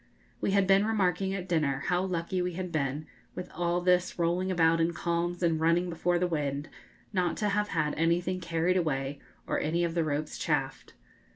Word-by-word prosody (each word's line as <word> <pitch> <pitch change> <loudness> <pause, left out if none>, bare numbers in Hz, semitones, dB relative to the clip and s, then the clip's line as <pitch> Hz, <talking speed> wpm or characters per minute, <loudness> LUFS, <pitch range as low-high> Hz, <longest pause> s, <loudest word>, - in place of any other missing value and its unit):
We - - 0
had 195 0 +3
been 195 +1 +5
remarking 195 -3 +1
at 185 -1 -5
dinner 150 -6 0
how 180 -1 +1
lucky 180 0 -1
we 180 0 -2
had 180 0 -4
been, 145 -1 -1 0.3
with 180 - -6
all 175 0 0
this 180 0 +2
rolling 175 +2 +1
about 165 -2 +3
in 165 +1 +1
calms 175 +1 -1
and 165 -2 +2
running 170 +2 +2
before 175 +1 +1
the 180 - +1
wind, 145 -4 -2 0.4
not 180 -3 0
to 210 - 0
have 210 +1 +1
had 155 -5 0
anything 175 +3 +1
carried 170 +1 0
away 140 -4 -1 0.3
or - - -1
any 170 +3 0
of 170 -1 -1
the 170 -1 +1
ropes 150 0 -3
chafed. - - -2
175 Hz, 190 wpm, -29 LUFS, 160-180 Hz, 0.4 s, been